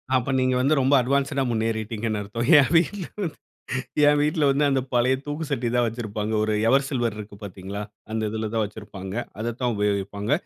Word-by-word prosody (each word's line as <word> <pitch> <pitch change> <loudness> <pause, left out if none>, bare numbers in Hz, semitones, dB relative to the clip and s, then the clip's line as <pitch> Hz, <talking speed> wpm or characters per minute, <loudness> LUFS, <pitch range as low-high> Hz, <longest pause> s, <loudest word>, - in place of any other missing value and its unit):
அப்ப 125 0 +1
நீங்க 130 0 +2
வந்து 140 +4 +3
ரொம்ப 135 +2 +3
அட்வான்ஸ்டா 135 +1 +1
முன்னேறிட்டிங்கன்னு 110 -1 -1
அர்த்தம்! 115 +4 -3
என் 140 - +3
வீட்ல 175 +2 +2 0.2
வந்து, 165 -6 -3 0.7
என் 145 0 +5
வீட்ல 150 +1 +1
வந்து, 140 +2 +2
அந்த 135 -1 +2
பழைய 125 +2 +3
தூக்குசட்டி 145 -5 -2
தான் 120 -1 +3
வச்சிருப்பாங்க. 110 -2 -3
ஒரு 110 - 0 0.2
எவர்சில்வர் 130 -4 +1
இருக்கு 105 -1 -8
பார்த்தீங்களா? 100 +1 -6 0.3
அந்த 110 0 -1
இதிலதான் 110 +1 -1
வச்சிருப்பாங்க, 100 -2 -8 0.3
அததான் 120 +2 -1
உபயோகிப்பாங்க. 100 +2 -1
115 Hz, 155 wpm, -24 LUFS, 105-135 Hz, 0.7 s, என்